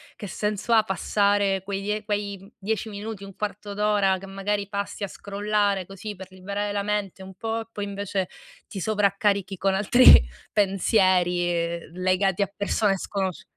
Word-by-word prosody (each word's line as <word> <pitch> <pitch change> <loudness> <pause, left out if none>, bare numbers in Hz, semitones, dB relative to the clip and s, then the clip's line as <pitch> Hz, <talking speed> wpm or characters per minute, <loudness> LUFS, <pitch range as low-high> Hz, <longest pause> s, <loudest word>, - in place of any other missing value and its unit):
che 205 - -7
senso 210 +5 -1
ha 220 -1 +6
passare 200 0 +1
quei 195 0 -3
die 210 +1 -2
quei 205 0 -4
10 220 +2 -2
minuti, 205 0 -6
un 195 -1 -10
quarto 205 0 -5
d'ora 205 -2 +2
che 195 - -10
magari 200 +1 -2
passi 200 0 -4
a - - -1
scrollare 200 -1 -1
così 200 +2 -7
per 190 0 -10
liberare 200 +2 -4
la 200 0 -1
mente 205 -2 -2
un 190 0 -10
po', 225 +3 -3
e 225 - -10
poi 205 -2 -4
invece 200 -2 -3 0.4
ti 195 - -6
sovraccarichi 200 -1 +1
con 195 +1 +1
altri 210 +6 +4 0.5
pensieri, 180 -4 +2
legati 185 +2 +1
a 200 - -6
persone 200 0 +1
sconosci 190 -2 -3
200 Hz, 160 wpm, -25 LUFS, 190-210 Hz, 0.5 s, ha